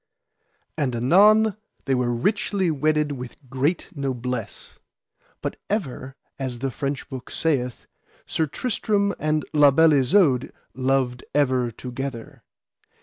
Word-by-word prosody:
And 130 -5 0
anon 205 - +5 0.3
they 135 - +1
were 125 -1 +1
richly 200 - 0
wedded 150 0 +1
with 125 -3 -7 0.2
great 140 +6 0
noblesse. 125 -3 -4 0.6
But - - -3
ever, 135 - -3 0.2
as 130 -3 -3
the 135 +2 -2
French 140 +1 -3
book 130 -2 -8
saith, 125 -6 -1 0.4
Sir 160 - -1
Tristram 200 - 0
and 155 0 0
La 150 -1 +7
Beale 160 +3 +5
Isoud 140 -2 +3 0.2
loved 130 -2 0
ever 130 -4 +2
together. 125 0 -7
135 Hz, 115 wpm, -24 LUFS, 125-160 Hz, 0.6 s, La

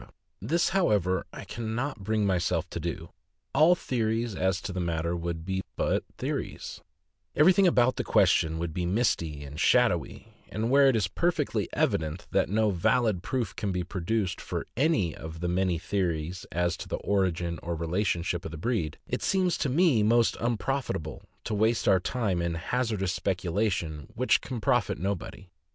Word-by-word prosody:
This, 170 +2 +1
however, 105 - +1
I - - -9
can 110 -1 -4
not 135 0 -2
bring 110 +1 +1
myself 90 -2 0
to - - -4
do. 80 0 -4 0.4
All 165 +3 +6
theories 115 - -1
as 95 -1 0
to 100 - -5
the 90 - -3
matter 85 0 -1
would 85 -1 -4
be 95 0 -1
but - - 0
theories - - -4 0.3
— 80 -2 -46
every 160 +5 +6
thing 195 0 +4
about 130 -6 +3
the - - -1
question 80 0 +3
would 85 -1 -3
be 90 - -2
misty 85 -7 0
and 70 +1 -8
shadowy; - - +2 0.2
and 110 +3 -2
where 140 0 +6
it 135 - +4
is 105 -6 +1
perfectly 135 - 0
evident 80 +2 -1
that - - +2
no 110 +1 +2
valid 105 +2 +1
proof 120 -1 -2
can 105 -3 -2
be 90 -1 -1
produced 95 +1 -2
for - - -4
any 135 - +2
of 80 +1 -8
the 90 - -2
many 90 0 +1
theories 85 -1 -2
as 85 0 0
to - - -7
the - - -2
origin 90 -4 0
or 85 0 -3
relationship, 85 0 -1
of - - -5
the 80 - -7
breed, 85 - -1
it - - -2
seems 185 -2 +2
to 140 - 0
me 145 -4 +4
most 115 +2 +3
unprofitable 120 - -2 0.2
to 110 - -3
waste 110 +3 +1
our 95 - +5
time 100 -3 -1
in 85 -1 -1
hazardous 100 0 -1
speculations 90 -5 -1
which 130 +2 +3
can 125 -3 -5
profit - - +1
nobody. 95 +1 -4
95 Hz, 175 wpm, -28 LUFS, 85-115 Hz, 0.4 s, All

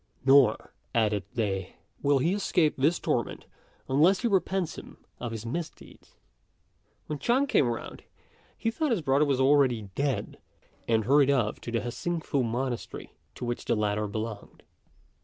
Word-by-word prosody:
"Nor," 135 0 +4 0.2
added 105 -3 +1
they, 95 -5 -2 0.3
"will 140 0 +3
he 165 +7 +1
escape 180 -6 +2
this 150 +6 +2
torment - - -2 0.4
unless 160 +9 +4
he 240 - +1
repents 190 -3 0
him - - -11 0.2
of 120 -2 -4
his 110 0 -6
misdeeds." 155 +6 -7 0.9
When 150 -1 -5
Chang 255 - +2
came 145 - +3
round, 115 -1 -5 0.6
he 225 - -1
thought 305 +6 -1
his 215 -10 0
brother 140 +2 +3
was 140 -3 +1
already 130 -7 +3
dead, 140 +1 -2 0.5
and 110 -2 +2
hurried 140 +1 +4
off 125 -6 +1
to 120 - -6
the 115 -1 0
Hsing 165 +8 -3
fu 140 -3 -1
monastery, 120 +1 -4 0.2
to - - -6
which 120 0 -4
the 120 - +1
latter 105 0 0
belonged. 110 0 -6
135 Hz, 155 wpm, -28 LUFS, 115-160 Hz, 0.9 s, Nor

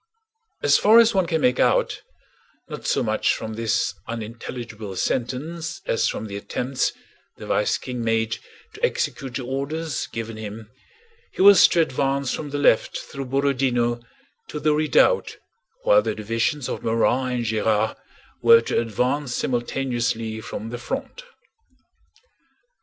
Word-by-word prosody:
As - - +5
far 220 +2 +6
as 230 0 +6
one 190 -3 +2
can 160 -2 0
make 125 -1 +2
out, - - +2 0.7
not - - -7
so - - +1
much - - +1
from 110 - -6
this 115 0 0
unintelligible 115 -2 -6
sentence 160 - -3
as 115 - +1
from 110 - -4
the 100 -2 -7
attempts 125 +5 -2 0.5
the - - -9
vice - - +1
King 125 -2 -5
made 115 0 0 0.3
to - - -13
execute 130 -3 -1
the 130 - -3
orders 140 +3 -3
given 115 -1 -6
him, 110 0 -8 0.6
he - - +1
was 200 -2 +9
to 170 - +2
advance 135 -2 0
from 150 - -5
the 145 - -3
left 145 -6 +3
through 140 -1 -7
Borodinó 125 -3 +1 0.5
to 150 - -5
the 150 0 +2
redoubt 155 - +2 0.5
while - - +5
the - - -2
divisions 115 +6 -1
of - - -5
Morand 125 +3 +1
and 120 -1 -2
Gérard 110 0 +1 0.5
were 460 0 +7
to - - 0
advance 125 +4 -1
simultaneously 120 -3 -2
from 110 +1 -6
the 120 - -5
front. 270 - -5
125 Hz, 140 wpm, -23 LUFS, 115-150 Hz, 0.7 s, was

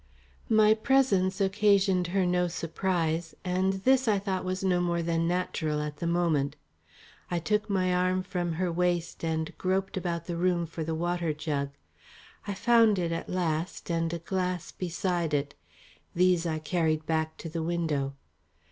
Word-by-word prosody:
My 215 -1 +6
presence 215 -6 +2
occasioned 195 -2 +3
her 190 +1 +1
no 180 0 +2
surprise 165 -1 -1
and 185 +1 +1
this 255 +6 +2
I 210 -2 +4
thought 195 -1 -2
was 185 +1 -3
no 180 -2 +2
more 170 -1 0
than 165 0 0
natural 170 -4 -1
at 150 0 -4
the 170 - -3
moment. 170 -5 +1 0.7
I 175 - 0
took 210 +6 0
my 185 -2 +1
arm 185 +1 +1
from 180 -3 -2
her 180 +2 -1
waist 175 -1 -1
and 160 -1 -2
groped 190 +1 0
about 175 -3 -2
the 170 -2 -4
room 175 -1 +1
for 165 0 -5
the 160 +1 -2
water 175 -1 -1
jug. 150 -2 -2 0.8
I 200 - -2
found 230 -1 +4
it 170 -2 -1
at 165 - -4
last 170 -1 -2
and 165 -1 0
a 170 - -2
glass 180 0 -2
beside 175 -3 -1
it. 140 0 -1 0.6
These 180 -1 +3
I 160 -1 -1
carried 155 0 0
back 160 -1 -1
to - - -7
the 165 +1 -3
window. 160 -5 -1
175 Hz, 165 wpm, -28 LUFS, 165-185 Hz, 0.8 s, My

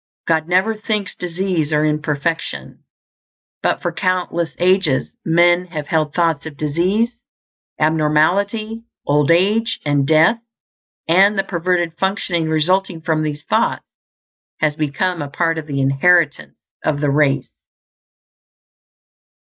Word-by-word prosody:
God 160 -1 +1
never 185 +5 +2
thinks 215 -2 -3
disease 175 -3 -2
or 150 0 +2
imperfection. 150 +2 -3 0.8
But - - -1
for - - -1
countless 180 -3 -2
ages 180 -6 +1
men 175 +2 +3
have 155 -4 -5
held 155 -1 -1
thoughts 165 -3 0
of 150 -3 -10
disease, 185 +11 0 0.7
abnormality, 175 +9 +1 0.2
old 145 +1 +2
age, 210 +7 +2
and 145 -2 +1
death; 160 +9 +4 0.7
and 195 +5 +4
the 195 - +2
perverted 175 -2 -1
functioning 190 -4 -1
resulting 170 +2 0
from 160 -1 0
these 150 -1 -4
thoughts - - 0 0.7
has 155 -1 +1
become 160 +3 -1
a 145 - -5
part 165 +2 0
of 155 - -9
the 140 -2 -3
inheritance 135 - +2 0.3
of 145 -2 0
the 145 -1 +1
race. 140 -1 +1
165 Hz, 120 wpm, -18 LUFS, 150-185 Hz, 0.8 s, death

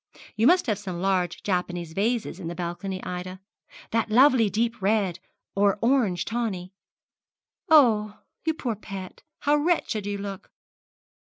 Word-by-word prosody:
You 225 +3 +3
must 355 +3 +5
have 215 -6 0
some 185 -4 -5
large 185 -1 0
Japanese 175 -3 -2
vases 215 -1 -1
in 175 - -6
the 170 - -5
balcony, 185 +2 -4
Ida. 185 +1 -5 0.5
That 230 0 0
lovely 250 -1 +5
deep 230 +3 -1
red, 195 -3 +1 0.3
or 200 0 +3
orange 230 -8 +2
tawny. 205 -6 -3 1.0
Oh, 220 -9 +5 0.3
you 320 -1 0
poor 245 -7 -2
pet, 195 -3 -8 0.2
how 295 +1 +3
wretched 295 - 0
you 205 0 -2
look!' 200 -1 -7
205 Hz, 140 wpm, -26 LUFS, 185-235 Hz, 1.0 s, must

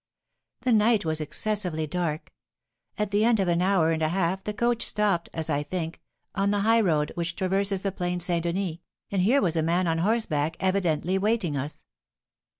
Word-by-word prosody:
The 250 - +2
night 215 -2 +3
was 160 -1 -1
excessively 180 -1 -1
dark. 160 -1 -3 0.7
At 210 -1 -1
the 205 +1 +2
end 230 -1 +3
of 190 - +1
an 170 0 +2
hour 180 -4 +3
and 160 0 -1
a 155 - +2
half 190 +1 0
the 210 - -3
coach 235 +2 0
stopped, 200 -5 0
as 160 -1 -4
I 145 -2 0
think, 165 +1 -5 0.3
on 200 0 +1
the 205 0 +1
highroad 200 -9 +2
which 170 0 -3
traverses 195 +1 0
the 195 - 0
Plain 180 -1 -2
St. 175 -1 -1
Denis, 170 -1 -2 0.3
and 195 -2 +1
here 240 +8 +3
was 170 -3 +1
a 160 - +2
man 170 +3 +1
on 165 -1 0
horseback, 165 -6 0
evidently 185 -2 +1
awaiting 200 -6 0
us. 140 +2 -5
180 Hz, 185 wpm, -26 LUFS, 165-205 Hz, 0.7 s, night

